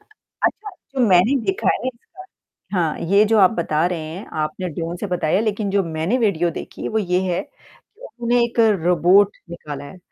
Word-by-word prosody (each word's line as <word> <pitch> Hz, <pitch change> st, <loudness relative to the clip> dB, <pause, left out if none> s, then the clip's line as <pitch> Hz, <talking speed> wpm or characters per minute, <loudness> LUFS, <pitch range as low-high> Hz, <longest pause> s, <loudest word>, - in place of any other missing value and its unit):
अच्छा, 425 Hz, 0 st, -5 dB, 0.2 s
जो 270 Hz, -, -1 dB
मैंने 190 Hz, +9 st, +4 dB
देखा 385 Hz, +1 st, 0 dB
है -, -, -4 dB
इसका 250 Hz, +6 st, -13 dB, 0.6 s
हाँ, 160 Hz, -3 st, 0 dB
ये 200 Hz, +5 st, +3 dB
जो 220 Hz, +1 st, +2 dB
आप 190 Hz, +1 st, +6 dB
बता 165 Hz, -4 st, 0 dB
रहे 175 Hz, -2 st, -3 dB
हैं, 160 Hz, +6 st, -7 dB
आपने 165 Hz, +4 st, -2 dB
ड्रोन 165 Hz, +2 st, -4 dB
से 205 Hz, -, -4 dB
बताया 180 Hz, 0 st, 0 dB
लेकिन 215 Hz, -2 st, -1 dB
जो 200 Hz, -1 st, +2 dB
मैंने 165 Hz, +8 st, -1 dB
वीडियो 180 Hz, -7 st, +1 dB
देखी -, -, -7 dB
वो 220 Hz, -, -1 dB
ये 180 Hz, -2 st, 0 dB
है 175 Hz, -, 0 dB
कि -, -, -18 dB, 0.2 s
उन्हे 240 Hz, 0 st, +3 dB
एक 235 Hz, 0 st, -3 dB, 0.3 s
रोबोट 180 Hz, +4 st, +4 dB
निकाला 145 Hz, -4 st, -7 dB
है 165 Hz, -, -11 dB
185 Hz, 185 wpm, -21 LUFS, 170-230 Hz, 0.6 s, आप